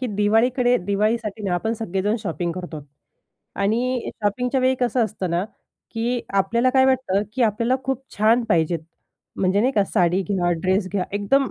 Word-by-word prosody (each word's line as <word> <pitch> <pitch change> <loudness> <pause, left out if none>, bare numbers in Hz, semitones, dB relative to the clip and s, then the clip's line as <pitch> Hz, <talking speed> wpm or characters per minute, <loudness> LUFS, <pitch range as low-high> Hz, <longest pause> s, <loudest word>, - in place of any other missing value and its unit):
की 255 - -1
दिवाळीकडे 245 +4 +3
दिवाळीसाठी 215 +1 0
ना 180 -3 0
आपण 220 +6 -1
सगळेजण 210 -1 -1
शॉपिंग 170 - -2
करतो. 175 -3 -7 0.8
आणि 235 +5 0
शॉपिंगच्या 250 +6 0
वेळी 260 +1 +3
कसं 245 -1 +2
असतं 190 -4 -4
ना, 175 +3 0 0.5
की 235 +1 -1 0.2
आपल्याला 235 +6 +2
काय 260 0 +4
वाटतं 240 -7 +1
की 260 - +1
आपल्याला 230 +3 +2
खूप 265 -1 -2
छान 225 +3 +3
पाहिजेत. 165 -3 +2 0.6
म्हणजे 190 +2 +2
नाही 255 +4 +2
का 205 -5 +2
साडी 180 -1 +1
घ्या, 180 -3 +1
ड्रेस 190 +1 +1
घ्या 195 -3 0
एकदम 225 +7 +1
215 Hz, 160 wpm, -22 LUFS, 190-245 Hz, 0.8 s, काय